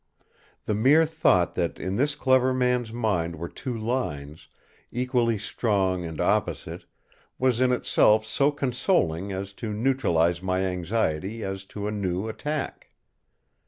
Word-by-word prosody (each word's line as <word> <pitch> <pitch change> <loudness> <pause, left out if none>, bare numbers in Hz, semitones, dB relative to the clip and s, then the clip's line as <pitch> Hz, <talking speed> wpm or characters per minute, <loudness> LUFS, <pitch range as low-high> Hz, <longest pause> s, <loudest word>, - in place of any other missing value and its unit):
The 105 - 0
mere 135 +10 +5
thought 95 - +2
that 85 -2 -2
in 95 +1 -3
this 145 +6 +1
clever 130 -2 +3
man's 125 -2 +1
mind 100 -8 -1
were 85 +2 -5
two 125 +6 -5
lines, 80 - -3 0.4
equally 120 -2 +1
strong 100 -3 0
and 80 -2 -7
opposite, - - -1 0.5
was 130 -2 +1
in 130 -1 +4
itself 110 -3 +3
so 140 +6 +2
consoling 125 - 0
as 95 +1 -5
to 110 -3 -3
neutralise 95 -8 +1
my 95 0 0
anxiety 95 +2 -1
as 95 0 -5
to 100 +1 -6
a - - -2
new 95 -1 -2
attack. 150 +6 -4
110 Hz, 135 wpm, -26 LUFS, 90-125 Hz, 0.5 s, mere